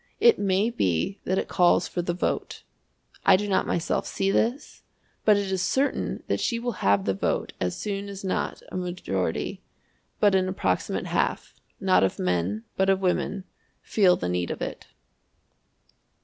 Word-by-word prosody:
It 465 +2 +6
may 200 +3 +2
be 95 - 0
that 185 - 0
it - - -1
calls 175 0 +3
for 175 - -2
the 175 0 -2
vote. 180 - -2 0.6
I 195 - +7
do 205 +2 -1
not 195 - +1
myself 170 - -1
see 195 0 0
this, 245 +8 -1 0.4
but 210 -2 +6
it 200 -1 -2
is 190 -1 0
certain 270 +9 0
that - - -1
she 235 - 0
will 240 +1 -2
have 100 -1 +3
the 95 - +1
vote 95 - -1
as 90 -1 -1
soon 200 -1 -4
as 200 0 -8
not 190 - -2
a - - -4
majority, 175 - -2 0.6
but 205 -2 +4
an 185 -1 +2
approximate 190 - -1
half, - - -1 0.3
not 190 - +4
of 95 - 0
men 90 +4 -1
but 190 0 +2
of 195 -1 +3
women 190 +1 0 0.4
feel 190 -4 +4
the 90 - -3
need 90 0 -1
of - - -4
it. - - -5
190 Hz, 170 wpm, -26 LUFS, -, 0.6 s, I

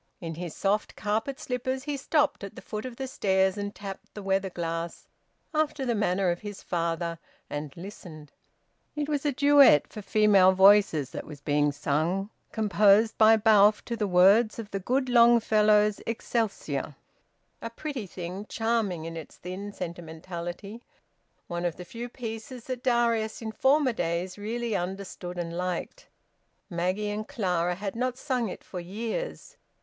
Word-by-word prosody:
In 165 -2 -5
his 170 0 -6
soft 205 +2 0
carpet 220 +6 -2
slippers 260 +1 -3
he 290 0 -3
stopped 290 -2 +1
at 200 - -7
the - - -9
foot 215 +2 -5
of 250 - -9
the 265 - -4
stairs 190 -6 +1
and 205 0 -5
tapped 195 -1 -9
the 205 - -7
weather 195 0 0
glass, 165 -1 -4 0.5
after 305 -3 0
the 240 - +1
manner 195 -3 +1
of 175 - -3
his 205 -2 -8
father; 170 -1 -2 0.3
and 145 -1 -4
listened. 170 -5 -10 0.6
It 295 -1 -2
was 295 -1 -1
a - - +2
duet 285 - +6
for 215 - -6
female 200 -2 +5
voices 190 -7 +5
that - - -6
was 150 -2 -9
being 145 0 +1
sung, 160 +8 -1 0.2
composed 210 +1 +4
by 220 0 +8
Balfe 210 -1 +5
to 235 - -3
the 215 -2 -1
words 200 +5 +5
of 225 -2 -7
the 195 - -2
good 255 +7 0
Longfellow's 215 -3 +4
"Excelsior." 205 - -2 0.7
A 230 - -4
pretty 255 -3 -5
thing, 185 +3 -7
charming 225 -8 -1
in 165 0 -6
its 160 -3 -9
thin 190 +3 -6
sentimentality; 175 +4 -7 0.6
one 175 0 -4
of 175 -2 -1
the 180 - -9
few 235 +5 -7
pieces 235 +1 -7
that 255 -1 -5
Darius 235 -3 +1
in 220 -1 -5
former 265 +3 +3
days 175 -1 -2
really 225 +2 -3
understood 180 -1 -5
and 170 -1 -4
liked. 180 - -4 0.6
Maggie 185 +5 -1
and 215 +1 -4
Clara 180 -4 0
had 195 +2 -5
not 250 +1 -1
sung 250 -6 -1
it - - -8
for 180 - -7
years. 220 - -5
205 Hz, 160 wpm, -27 LUFS, 175-230 Hz, 0.7 s, by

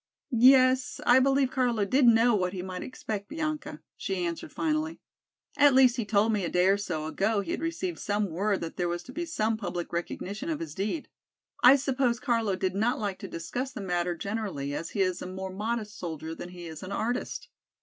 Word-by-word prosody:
"Yes, 255 +1 +5
I 245 +2 +7
believe 270 0 +3
Carlo 240 -5 +1
did 255 +5 +4
know 230 +1 +6
what 180 -3 0
he 180 -2 -4
might 185 -1 -5
expect 210 -5 -5
Bianca," 305 -1 -4
she 190 -2 -2
answered 170 -1 -4
finally. 315 0 -1 0.6
"At 285 -2 +6
least 260 -1 +6
he 235 - -1
told 210 +1 +2
me 205 -2 0
a 170 - -1
day 180 +1 +3
or 200 - +4
so 155 -6 -3
ago 200 +6 0
he - - -5
had - - -2
received 335 +2 -3
some 205 -2 -1
word 195 +4 0
that 165 -1 -6
there 175 -1 0
was 175 0 -3
to 255 - -11
be 340 +4 -3
some 225 -8 0
public 175 -5 -5
recognition 200 - -4
of 310 -2 -2
his 330 - -6
deed. 210 - -3 0.5
I 250 +2 +9
suppose 260 -3 +1
Carlo 230 -7 +1
did 185 0 -1
not 220 +5 +1
like 200 -3 -3
to - - -6
discuss 250 +11 -4
the - - -6
matter 175 -2 -1
generally 195 -8 -3
as 165 +3 -4
he 200 - -1
is 185 -1 0
a - - -5
more 190 0 -6
modest 215 +1 -3
soldier 160 -2 -5
than 175 - -8
he 175 -1 -9
is 160 -2 -8
an 185 - -7
artist." 235 +5 -3
210 Hz, 210 wpm, -28 LUFS, 185-255 Hz, 0.6 s, I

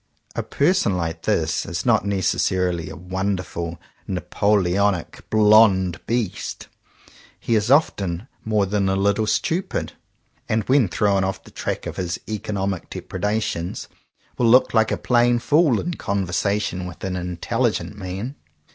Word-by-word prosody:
A - - 0
person 145 - +1
like 80 -1 -3
this - - 0
is - - -4
not - - +3
necessarily 90 -3 0
a - - -8
wonderful 90 -2 -3 0.3
Napoleonic 95 -1 0
"blond 105 -4 +5
beast." 115 -4 -3 0.7
He 115 - -1
is 110 0 +2
often 100 - +2 0.2
more 105 -2 +1
than 100 0 0
a 95 - +1
little 100 +2 +1
stupid; 170 - -1 0.6
and 110 0 +1
when 130 -2 +3
thrown 100 +2 +1
off 95 0 -3
the - - -15
track - - -4
of - - -6
his 85 -2 -2
economic 100 -4 -3
dep - - -8
redations, 105 -5 -2 0.5
will 120 -2 +4
look 125 +2 +5
like 110 -1 +3
a - - 0
plain 120 0 +3
fool 145 -1 +3
in 175 - -3
conversation 100 - -1
with 90 - -10
an 95 -1 -2
intelligent 90 +3 -1
man. 100 +6 -5
100 Hz, 140 wpm, -22 LUFS, 90-110 Hz, 0.7 s, blond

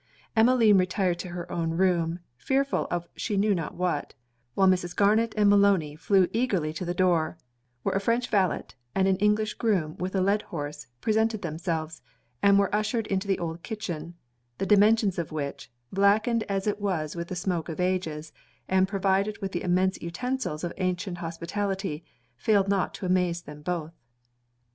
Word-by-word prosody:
Emmeline 225 -3 +5
retired 185 -1 0
to - - -5
her 175 0 -6
own 165 -1 -1
room, 175 -2 +1
fearful 270 - 0
of 175 0 -2
she 210 -4 -2
knew 205 +1 +3
not 165 -5 -3
what; 180 -5 -2 0.4
while 195 - +4
Mrs. 180 -2 +1
Garnet 215 +3 +3
and 210 -1 +4
Maloney 200 -7 +4
flew 190 +3 +3
eagerly 195 -10 0
to 160 - -5
the 175 0 -3
door; 170 -3 +2 0.5
where - - 0
a 195 - +2
French 235 +4 +1
valet, 195 -4 +1 0.3
and 190 0 +3
an 190 - +3
English 210 +1 +2
groom 185 -10 0
with 185 +2 -3
a - - +2
led 200 +3 +2
horse, 150 -6 -6
presented 220 -1 +1
themselves, 160 -1 -3 0.4
and 200 0 +5
were 200 0 +2
ushered 215 +2 0
into 195 0 -2
the 195 - +2
old 165 0 -4
kitchen; 175 -7 -5 0.4
the - - -1
dimensions 210 -1 +4
of 165 - -4
which, 145 -2 -5 0.2
blackened 210 +4 +3
as 195 -1 -1
it 210 -1 -1
was 170 -7 -1
with 170 0 -4
the 185 - -5
smoke 175 -2 -2
of 160 - -6
ages, 165 -4 -2 0.3
and 190 0 +3
provided 195 +1 +1
with 195 -2 -4
the - - -3
immense 185 +1 +1
utensils 180 -2 -3
of 175 - -3
ancient 185 -1 -2
hospitality, 175 0 -3 0.3
failed 195 - +2
not 195 -2 +1
to - - -6
amaze 180 -2 +1
them 150 0 -10
both. 165 0 -3
185 Hz, 170 wpm, -27 LUFS, 170-205 Hz, 0.5 s, Emmeline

